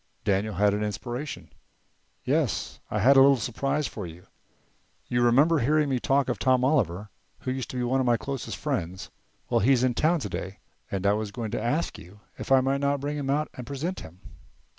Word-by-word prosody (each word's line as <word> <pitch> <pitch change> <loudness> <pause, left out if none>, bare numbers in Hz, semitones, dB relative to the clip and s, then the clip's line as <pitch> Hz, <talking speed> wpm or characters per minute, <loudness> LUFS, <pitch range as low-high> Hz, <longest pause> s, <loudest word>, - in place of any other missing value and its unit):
Daniel 100 +1 0
had 100 +2 +3
an 105 - -1
inspiration. 120 +7 -5 0.7
"Yes, - - -1
I - - -2
had 135 +6 +6
a - - +9
little 135 0 +6
surprise 135 +6 -1
for 105 -7 -5
you. 85 +2 -12 0.8
You 120 0 0
remember 140 +7 +4
hearing 150 +4 +2
me 130 -2 0
talk 135 +2 +2
of 125 - -2
Tom 130 -1 +3
Oliver, 105 - 0 0.3
who 130 - -2
used 130 -2 -4
to 125 - -5
be 125 - -1
one 130 +2 +1
of 130 - +1
my 120 -1 +4
closest 135 +4 -5
friends. 95 - -3 0.4
Well, - - +4
he's 125 +3 +3
in 130 -1 +2
town 160 +6 +2
today 100 -4 -5 0.3
and 95 0 -3
I 100 - +4
was 105 0 -2
going 110 0 -5
to - - -2
ask 145 +9 -1
you 95 +4 -14 0.2
if - - -6
I 135 -1 +7
might 135 +1 0
not 140 0 +1
bring 145 +2 -3
him 140 -2 -3
out 150 +2 +1
and 125 -2 -9
present 155 +8 -3
him." 85 +3 -12
125 Hz, 205 wpm, -26 LUFS, 105-140 Hz, 0.8 s, a